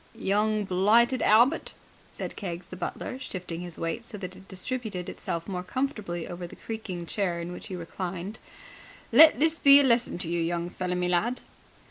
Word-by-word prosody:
"Young 210 Hz, +1 st, +1 dB
blighted 220 Hz, +7 st, +3 dB
Albert," 240 Hz, +9 st, +4 dB, 0.4 s
said -, -, -6 dB
Keggs 175 Hz, -3 st, -5 dB
the 185 Hz, -, -10 dB
butler, 195 Hz, +7 st, -5 dB
shifting 180 Hz, -9 st, -6 dB
his 175 Hz, -2 st, -8 dB
weight 165 Hz, +7 st, -3 dB
so 230 Hz, -2 st, -6 dB
that 185 Hz, -2 st, -7 dB
it 190 Hz, +1 st, -15 dB
distributed 200 Hz, -1 st, -4 dB
itself 170 Hz, 0 st, -4 dB
more 185 Hz, -3 st, -3 dB
comfortably 195 Hz, -, -3 dB
over 175 Hz, 0 st, -6 dB
the -, -, -12 dB
creaking 200 Hz, -6 st, -6 dB
chair 175 Hz, -2 st, -1 dB
in 170 Hz, +1 st, -5 dB
which 180 Hz, -, -8 dB
he 190 Hz, -, -5 dB
reclined, 180 Hz, +3 st, -5 dB, 0.7 s
"let 315 Hz, -5 st, +8 dB
this 320 Hz, +2 st, +2 dB
be 280 Hz, 0 st, +9 dB
a -, -, +4 dB
lesson 240 Hz, -7 st, +2 dB
to 175 Hz, -1 st, -5 dB
you, 170 Hz, 0 st, -1 dB
young 170 Hz, +1 st, -2 dB
feller 180 Hz, -1 st, -2 dB
me 180 Hz, 0 st, 0 dB
lad." 210 Hz, +8 st, 0 dB
190 Hz, 180 wpm, -27 LUFS, 175-230 Hz, 0.7 s, be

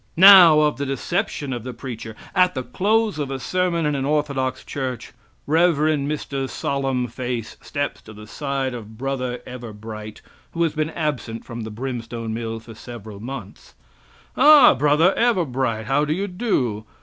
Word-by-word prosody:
Now, 180 Hz, -4 st, +9 dB
of 150 Hz, -1 st, +1 dB
the 140 Hz, -, -2 dB
deception 145 Hz, -, -2 dB
of 120 Hz, -3 st, -5 dB
the 125 Hz, -1 st, -7 dB
preacher. 115 Hz, -3 st, -7 dB, 0.2 s
At 180 Hz, -2 st, +3 dB
the 130 Hz, -, -2 dB
close 210 Hz, -, 0 dB
of 145 Hz, -2 st, -2 dB
a 135 Hz, -, -3 dB
sermon 175 Hz, +1 st, 0 dB
in 150 Hz, -, +1 dB
an 135 Hz, -2 st, -1 dB
orthodox 140 Hz, -3 st, -1 dB
church, 130 Hz, -3 st, -5 dB, 0.3 s
Rev. 165 Hz, +3 st, +3 dB
Mr. 145 Hz, -2 st, -1 dB
Solemnface 125 Hz, -3 st, -3 dB
steps 145 Hz, -1 st, -3 dB
to 110 Hz, -, -13 dB
the 105 Hz, 0 st, -11 dB
side 135 Hz, +1 st, -3 dB
of 110 Hz, -2 st, -9 dB
Bro. 130 Hz, -1 st, -3 dB
Everbright, 110 Hz, -3 st, -8 dB, 0.3 s
who 170 Hz, -, 0 dB
has 160 Hz, -3 st, 0 dB
been 155 Hz, 0 st, -1 dB
absent 145 Hz, -8 st, -3 dB
from 120 Hz, -1 st, -7 dB
the 110 Hz, -, -5 dB
brimstone 115 Hz, -1 st, -5 dB
mill 115 Hz, 0 st, -4 dB
for 115 Hz, +1 st, -12 dB
several 110 Hz, -3 st, -10 dB
months: 130 Hz, +5 st, -9 dB, 0.6 s
"Ah, 295 Hz, -4 st, +8 dB
Bro. 145 Hz, +3 st, +2 dB, 0.2 s
Everbright, 130 Hz, -, 0 dB
how 135 Hz, +5 st, +2 dB
do 150 Hz, +1 st, 0 dB
you 195 Hz, +5 st, -2 dB
do? 160 Hz, -, -1 dB
135 Hz, 160 wpm, -22 LUFS, 120-155 Hz, 0.6 s, Now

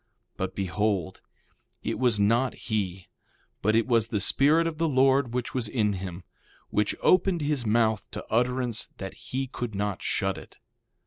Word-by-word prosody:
But 95 Hz, 0 st, -4 dB
behold, 100 Hz, -1 st, -1 dB, 0.6 s
it -, -, -2 dB
was 120 Hz, -5 st, +2 dB
not 115 Hz, +6 st, +2 dB
he, 95 Hz, -5 st, -3 dB, 0.5 s
but 110 Hz, +2 st, +2 dB
it 115 Hz, -, +3 dB
was 115 Hz, -3 st, +2 dB
the 110 Hz, -3 st, -1 dB
Spirit 150 Hz, +10 st, +4 dB
of 165 Hz, -1 st, -3 dB
the 165 Hz, -, +2 dB
Lord 135 Hz, -1 st, +3 dB
which 125 Hz, -1 st, -2 dB
was 125 Hz, -4 st, 0 dB
in 105 Hz, -2 st, +1 dB
him, 90 Hz, -1 st, -6 dB, 0.5 s
which 105 Hz, 0 st, +1 dB
opened 185 Hz, -2 st, +4 dB
his 145 Hz, -5 st, 0 dB
mouth 110 Hz, -2 st, +2 dB
to 105 Hz, -, -7 dB
utterance 125 Hz, 0 st, 0 dB
that 95 Hz, -1 st, -6 dB
he 135 Hz, +1 st, -4 dB
could 120 Hz, -4 st, -5 dB
not 105 Hz, -1 st, -2 dB
shut -, -, -1 dB
it. -, -, -15 dB
115 Hz, 165 wpm, -27 LUFS, 105-130 Hz, 0.6 s, Spirit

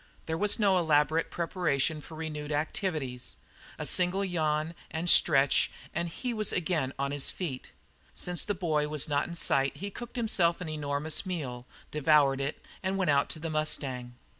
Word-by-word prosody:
There 160 Hz, -, -2 dB
was 205 Hz, +4 st, +3 dB
no 195 Hz, -4 st, +4 dB
elaborate 155 Hz, 0 st, +2 dB
preparation 160 Hz, -3 st, 0 dB
for 160 Hz, -, -11 dB
renewed 155 Hz, -2 st, -5 dB
activities. 150 Hz, -4 st, -2 dB, 0.4 s
A -, -, -4 dB
single 185 Hz, +2 st, +2 dB
yawn 155 Hz, -3 st, 0 dB, 0.2 s
and 165 Hz, +2 st, -3 dB
stretch 140 Hz, -5 st, +5 dB, 0.2 s
and 170 Hz, -, -1 dB
he 245 Hz, +8 st, -3 dB
was 215 Hz, -2 st, 0 dB
again 160 Hz, -6 st, 0 dB
on 140 Hz, 0 st, -1 dB
his 145 Hz, -1 st, -1 dB
feet. 150 Hz, -9 st, -5 dB, 0.5 s
Since 180 Hz, -1 st, -2 dB
the 205 Hz, -, -2 dB
boy 155 Hz, -5 st, 0 dB
was 150 Hz, 0 st, +2 dB
not 145 Hz, -1 st, +1 dB
in 170 Hz, -, -7 dB
sight 135 Hz, -4 st, +2 dB
he 200 Hz, +1 st, -5 dB
cooked 240 Hz, +5 st, -9 dB
himself 185 Hz, -8 st, +2 dB
an 180 Hz, -3 st, -5 dB
enormous 150 Hz, 0 st, -1 dB
meal, 135 Hz, -10 st, -5 dB, 0.2 s
devoured 145 Hz, -2 st, +4 dB
it, 140 Hz, +2 st, -4 dB, 0.2 s
and 190 Hz, 0 st, -1 dB
went 185 Hz, -6 st, +2 dB
out 140 Hz, 0 st, +2 dB
to 160 Hz, -, -3 dB
the 165 Hz, 0 st, -4 dB
mustang. 135 Hz, -5 st, -1 dB
155 Hz, 170 wpm, -29 LUFS, 145-180 Hz, 0.5 s, stretch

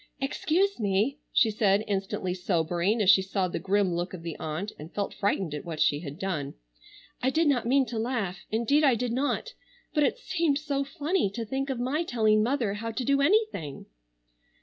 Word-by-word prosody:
"Excuse 330 Hz, +7 st, 0 dB
me," 210 Hz, +7 st, +1 dB
she 225 Hz, -, +4 dB
said, 205 Hz, -1 st, +2 dB
instantly 195 Hz, -2 st, -2 dB
sobering 180 Hz, +3 st, 0 dB
as 190 Hz, -, +3 dB
she 190 Hz, -, +5 dB
saw 190 Hz, 0 st, -1 dB
the 175 Hz, -, -4 dB
grim 195 Hz, +1 st, +1 dB
look 175 Hz, +2 st, -3 dB
of 165 Hz, -, -10 dB
the 165 Hz, -2 st, -5 dB
aunt, 160 Hz, +7 st, -4 dB
and 155 Hz, +3 st, -9 dB
felt 200 Hz, -1 st, -3 dB
frightened 195 Hz, -5 st, -1 dB
at 150 Hz, -, -5 dB
what 165 Hz, -3 st, -6 dB
she 145 Hz, -, +3 dB
had 145 Hz, -2 st, -7 dB
done. 170 Hz, -8 st, -3 dB, 0.7 s
"I 260 Hz, -, +2 dB
did 315 Hz, +4 st, +2 dB
not 245 Hz, -5 st, +2 dB
mean 270 Hz, +2 st, +4 dB
to 235 Hz, -3 st, -4 dB
laugh, 220 Hz, -6 st, -2 dB
indeed 235 Hz, +7 st, +2 dB
I 270 Hz, -4 st, +5 dB
did 245 Hz, +1 st, -2 dB
not; 285 Hz, -, -1 dB, 0.4 s
but 300 Hz, -, +2 dB
it -, -, +1 dB
seemed 335 Hz, -, 0 dB
so 285 Hz, -2 st, -1 dB
funny 295 Hz, -, 0 dB
to 230 Hz, -, -3 dB
think 270 Hz, +5 st, -3 dB
of 260 Hz, -3 st, -2 dB
my 260 Hz, +6 st, 0 dB
telling 215 Hz, -7 st, +2 dB
mother 235 Hz, -3 st, 0 dB
how 225 Hz, +2 st, -4 dB
to 240 Hz, +2 st, -3 dB
do 280 Hz, +1 st, +3 dB
anything." 285 Hz, -, +1 dB
220 Hz, 195 wpm, -28 LUFS, 190-275 Hz, 0.7 s, she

